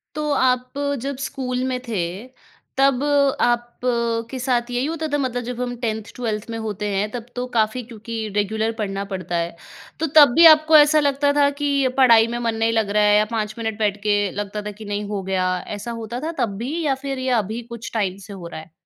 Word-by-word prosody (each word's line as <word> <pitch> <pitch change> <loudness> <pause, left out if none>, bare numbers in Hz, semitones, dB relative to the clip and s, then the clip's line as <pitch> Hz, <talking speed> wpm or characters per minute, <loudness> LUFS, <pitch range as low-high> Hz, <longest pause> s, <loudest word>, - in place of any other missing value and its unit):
तो 300 -1 -1
आप 250 -2 +1 0.3
जब 275 0 -3
स्कूल 255 -2 -3
में 255 -1 -2
थे, 210 -6 -1 0.8
तब 270 0 +3 0.4
आपके 240 0 -1
साथ 245 -1 0
यही 245 +2 0
होता 320 0 -3
था - - +3
मतलब 250 -3 -2
जब 250 +1 -5
हम 245 -1 -3
10th-12th 220 -1 -4
में 225 - -4
होते 210 -1 -4
हैं, 205 +2 0
तब 235 -2 -6
तो 250 0 -2
काफ़ी 220 +3 +1
क्योंकि 230 0 -8 0.2
रेगुलर 220 +2 0
पढ़ना 195 -1 -2
पड़ता 185 -2 -4
है। 170 0 -2 0.4
तो 320 - 0
तब 290 -5 +8
भी 335 +1 +7
आपको 310 0 +4
ऐसा 300 +1 +6
लगता 285 0 +2
था 285 -1 +4
कि 280 -2 +2
पढ़ाई 230 -4 +6
में 240 +1 -3
मन 230 -1 -1
नहीं 225 +1 +1
लग 220 -3 +1
रहा 210 +1 +2
है 210 0 +5
या 210 - +3
5 220 -1 -2
मिनट 220 -1 -3
बैठ 205 -1 +1
के 205 -1 +2
लगता 205 +1 -4
था 210 0 -5
कि, 210 +1 -11
"नहीं, 205 0 -3
हो 200 -2 -2
गया।" 185 -1 0 0.2
ऐसा 235 +3 -6
होता 235 +3 -5
था 325 - -2
तब 200 -3 -3
भी 275 +9 -3
या 270 -2 +2
फिर 270 -1 -3
ये 260 0 -2
अभी 220 +4 -5
कुछ 230 -1 -7
टाइम 195 -4 -1
से 200 - -9
हो 175 -3 -8
रहा 165 - -7
है? 160 +1 -17
230 Hz, 215 wpm, -22 LUFS, 210-260 Hz, 0.8 s, तब